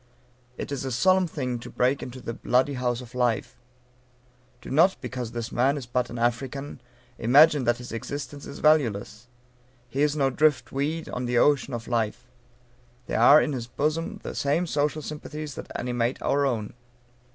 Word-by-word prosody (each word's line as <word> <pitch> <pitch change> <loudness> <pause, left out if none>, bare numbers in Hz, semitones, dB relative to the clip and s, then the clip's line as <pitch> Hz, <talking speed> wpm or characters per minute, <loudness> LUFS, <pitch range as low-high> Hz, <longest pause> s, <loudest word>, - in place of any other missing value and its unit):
It - - -5
is 140 -2 -3
a 135 - -3
solemn 185 +9 +3
thing 125 -6 -3
to - - -9
break 130 +3 +1
into 125 +1 -8
the 115 - -5
"bloody 130 +4 +1
house 125 -1 -1
of 125 0 -12
life." 125 -3 -1 1.0
Do - - -10
not, 170 +7 +4
because 125 -3 -5
this 120 -1 -5
man 135 +4 +2
is 135 - -6
but 125 0 -1
an 120 - -7
African, 125 +3 -2 0.4
imagine 145 +3 +5
that 120 0 +2
his 125 0 -9
existence 140 +4 -6
is - - -8
valueless. 120 -7 +1 0.6
He 135 +3 -2
is 150 0 +2
no 135 -3 +2
drift 145 +1 +2
weed 150 +4 -2
on 125 - -3
the 120 0 0
ocean 140 -1 +3
of 120 0 -7
life. 120 +1 -2 0.7
There - - -2
are 145 +5 +8
in 150 - 0
his 120 -3 -4
bosom 155 +6 -2
the - - -5
same 145 +5 0
social 150 -1 -1
sympathies 150 0 -6
that - - -9
animate 120 0 -1
our 140 0 +2
own. 110 -5 -2
130 Hz, 175 wpm, -26 LUFS, 120-145 Hz, 1.0 s, are